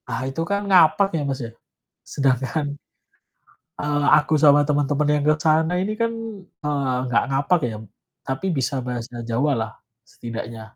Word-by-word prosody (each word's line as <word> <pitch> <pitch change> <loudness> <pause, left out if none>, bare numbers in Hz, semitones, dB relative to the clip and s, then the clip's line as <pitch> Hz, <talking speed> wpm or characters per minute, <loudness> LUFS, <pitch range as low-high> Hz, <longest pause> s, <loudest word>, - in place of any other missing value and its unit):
Ah, - - -3
itu 135 +5 -4
kan 200 0 0
ngapak 180 0 +5
ya 160 - 0
Mas 135 0 -2
ya, 115 - -8 0.6
sedangkan 140 +2 0 1.0
eee, 145 0 0
aku 150 +1 0
sama 145 -1 +5
teman-teman 145 0 +1
yang 145 - 0
ke 155 - +6
sana 160 +2 +2
ini 200 +3 -1
kan, 230 0 +1 0.5
eee, 140 -3 0
nggak 125 - +2
ngapak 140 +6 +2
ya, 110 - -6 0.5
tapi 135 +7 -3
bisa 130 +1 -1
bahasa 120 -1 -5
Jawa 120 +6 0
lah, 110 -2 -3 0.3
setidaknya. 115 -1 -8
145 Hz, 150 wpm, -22 LUFS, 125-155 Hz, 1.0 s, ke